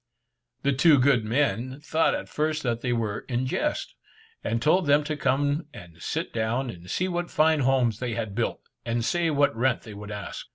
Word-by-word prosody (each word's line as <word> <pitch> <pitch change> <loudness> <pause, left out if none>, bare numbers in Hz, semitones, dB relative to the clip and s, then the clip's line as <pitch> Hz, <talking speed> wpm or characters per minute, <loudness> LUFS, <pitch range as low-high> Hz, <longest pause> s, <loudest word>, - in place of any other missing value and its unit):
The 140 - +2
two 150 +3 +5
good 125 -3 +4
men 130 +2 0
thought 155 +2 +1
at - - -5
first 155 +1 -1
that 120 -2 -1
they 125 - -1
were 110 -4 -1
in 125 +1 0
jest, 300 - -2 0.5
and 115 - 0
told 160 +7 +3
them 145 +1 +5
to 155 +1 -3
come 145 +3 0
and 85 -1 -12
sit - - -3
down, 115 +3 -1
and 90 -1 -12
see 185 - 0
what 175 -1 -2
fine 155 0 +3
homes 125 -5 +2
they 120 -3 -2
had 110 -4 -3
built, 115 +3 -2 0.2
and 115 0 -1
say 175 +3 +1
what 145 -4 +2
rent 125 +2 +1
they 110 - -9
would 105 +1 -9
ask. 105 -1 -6
130 Hz, 200 wpm, -26 LUFS, 115-150 Hz, 0.5 s, two